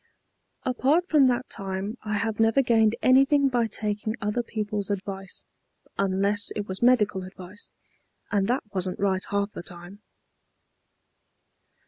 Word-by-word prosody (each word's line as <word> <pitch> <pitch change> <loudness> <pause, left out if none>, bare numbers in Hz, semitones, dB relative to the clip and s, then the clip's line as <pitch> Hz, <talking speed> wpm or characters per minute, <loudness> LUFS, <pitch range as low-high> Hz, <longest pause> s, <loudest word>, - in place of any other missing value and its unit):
"Apart 275 +7 +2
from 295 -6 +5
that 250 +1 0
time 195 +1 -4
I 210 -1 -3
have 220 +1 -2
never 225 +4 +4
gained 225 -2 +3
anything 275 +2 +5
by 240 -3 +1
taking 215 0 -3
other 210 +3 -1
people's 210 -3 -3
advice, 195 -1 -4 0.5
unless 200 +1 +2
it 205 -1 -3
was 190 0 -5
medical 225 -6 +3
advice, 185 +2 -10 0.6
and 200 -2 +2
that 250 +4 0
wasn't 185 -1 -2
right 190 -1 +1
half 200 0 0
the - - -7
time." 175 +4 -8
210 Hz, 130 wpm, -26 LUFS, 195-240 Hz, 0.6 s, from